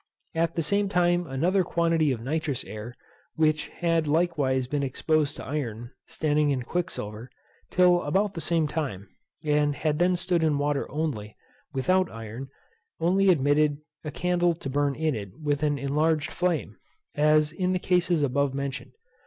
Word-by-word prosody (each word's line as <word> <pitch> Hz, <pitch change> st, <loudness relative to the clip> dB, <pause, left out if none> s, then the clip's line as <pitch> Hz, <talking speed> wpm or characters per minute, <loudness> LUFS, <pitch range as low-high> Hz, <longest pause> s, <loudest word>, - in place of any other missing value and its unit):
At 165 Hz, 0 st, 0 dB
the 165 Hz, -, 0 dB
same 200 Hz, +6 st, +1 dB
time 175 Hz, -2 st, +2 dB
another 175 Hz, +9 st, +1 dB
quantity 165 Hz, -3 st, +1 dB
of 120 Hz, -3 st, -3 dB
nitrous 150 Hz, 0 st, -2 dB
air, 110 Hz, +3 st, -8 dB, 0.4 s
which 155 Hz, -1 st, +2 dB
had 165 Hz, -2 st, 0 dB
likewise 145 Hz, -5 st, +1 dB
been 145 Hz, +3 st, -2 dB
exposed 145 Hz, +2 st, 0 dB
to -, -, -8 dB
iron, 120 Hz, -5 st, -4 dB, 0.2 s
standing 150 Hz, -1 st, +1 dB
in 130 Hz, -3 st, 0 dB
quicksilver, 120 Hz, -8 st, -4 dB, 0.4 s
till 180 Hz, -1 st, +4 dB
about 195 Hz, +7 st, 0 dB
the 165 Hz, -, -5 dB
same 165 Hz, -2 st, +1 dB
time, 140 Hz, -, -4 dB, 0.4 s
and 150 Hz, -1 st, +2 dB
had 150 Hz, 0 st, -1 dB
then 180 Hz, +1 st, +3 dB
stood 180 Hz, -1 st, 0 dB
in 155 Hz, -3 st, +2 dB
water 145 Hz, 0 st, -1 dB
only, 135 Hz, -9 st, -3 dB, 0.3 s
without 185 Hz, +7 st, +2 dB
iron, 115 Hz, +4 st, -7 dB, 0.5 s
only 190 Hz, +3 st, +3 dB
admitted 145 Hz, -2 st, +3 dB, 0.3 s
a 150 Hz, -, -4 dB
candle 175 Hz, +2 st, +1 dB
to 135 Hz, -5 st, -6 dB
burn 140 Hz, 0 st, +1 dB
in 155 Hz, -1 st, 0 dB
it 100 Hz, -, -7 dB
with 145 Hz, -2 st, -1 dB
an 145 Hz, -1 st, +1 dB
enlarged 150 Hz, +3 st, 0 dB
flame, 170 Hz, -, -1 dB, 0.4 s
as 150 Hz, 0 st, +3 dB
in 180 Hz, +3 st, -1 dB
the 185 Hz, -, +1 dB
cases 180 Hz, -3 st, +1 dB
above 140 Hz, 0 st, +1 dB
mentioned. 140 Hz, -1 st, -4 dB
150 Hz, 160 wpm, -26 LUFS, 140-170 Hz, 0.5 s, till